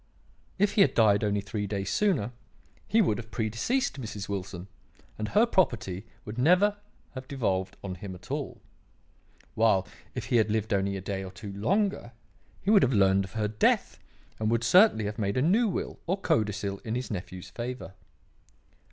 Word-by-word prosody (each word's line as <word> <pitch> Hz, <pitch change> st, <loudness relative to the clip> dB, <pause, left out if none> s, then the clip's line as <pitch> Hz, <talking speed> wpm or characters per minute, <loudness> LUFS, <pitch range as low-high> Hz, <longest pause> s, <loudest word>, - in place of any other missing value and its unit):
If 205 Hz, +1 st, +3 dB
he 205 Hz, -, +3 dB
had -, -, +4 dB
died 105 Hz, -3 st, +4 dB
only 105 Hz, -1 st, +1 dB
three 105 Hz, 0 st, -4 dB
days 100 Hz, -1 st, -3 dB
sooner, 165 Hz, -, +1 dB, 0.6 s
he 225 Hz, 0 st, +4 dB
would 110 Hz, -, 0 dB
have 115 Hz, -1 st, -9 dB
predeceased 120 Hz, -, -1 dB
Mrs. 105 Hz, -3 st, -6 dB
Wilson, 95 Hz, -2 st, -5 dB, 0.5 s
and 110 Hz, -, -2 dB
her 215 Hz, -, +4 dB
property 115 Hz, -, 0 dB, 0.2 s
would 115 Hz, +2 st, -6 dB
never 185 Hz, +9 st, +4 dB, 0.4 s
have 130 Hz, -1 st, -8 dB
devolved 95 Hz, -8 st, -1 dB
on 95 Hz, -2 st, -4 dB
him 95 Hz, +1 st, -7 dB
at 90 Hz, -, -12 dB
all; -, -, -4 dB, 0.9 s
while, 110 Hz, -4 st, +3 dB, 0.3 s
if -, -, -4 dB
he -, -, +6 dB
had 110 Hz, -1 st, +3 dB
lived 110 Hz, 0 st, 0 dB
only 100 Hz, 0 st, 0 dB
a -, -, -6 dB
day 95 Hz, 0 st, -4 dB
or 95 Hz, -, -7 dB
two 100 Hz, +1 st, -8 dB
longer, 160 Hz, -, 0 dB, 0.5 s
he 200 Hz, -, +2 dB
would 205 Hz, -3 st, +7 dB
have 130 Hz, -, +2 dB
learned 95 Hz, -2 st, +4 dB
of 95 Hz, -, -13 dB
her 110 Hz, -1 st, 0 dB
death 105 Hz, 0 st, +1 dB, 0.4 s
and 110 Hz, 0 st, 0 dB
would 115 Hz, 0 st, +1 dB
certainly 180 Hz, -, +5 dB
have 105 Hz, +1 st, -4 dB
made 100 Hz, 0 st, -1 dB
a -, -, +3 dB
new 215 Hz, +9 st, +3 dB
will 190 Hz, -, -3 dB
or 185 Hz, +3 st, +1 dB
codicil 105 Hz, -, 0 dB
in 110 Hz, 0 st, -4 dB
his 125 Hz, 0 st, -4 dB
nephew's 90 Hz, -2 st, -6 dB
favour. 120 Hz, -4 st, -6 dB
110 Hz, 180 wpm, -28 LUFS, 100-135 Hz, 0.9 s, would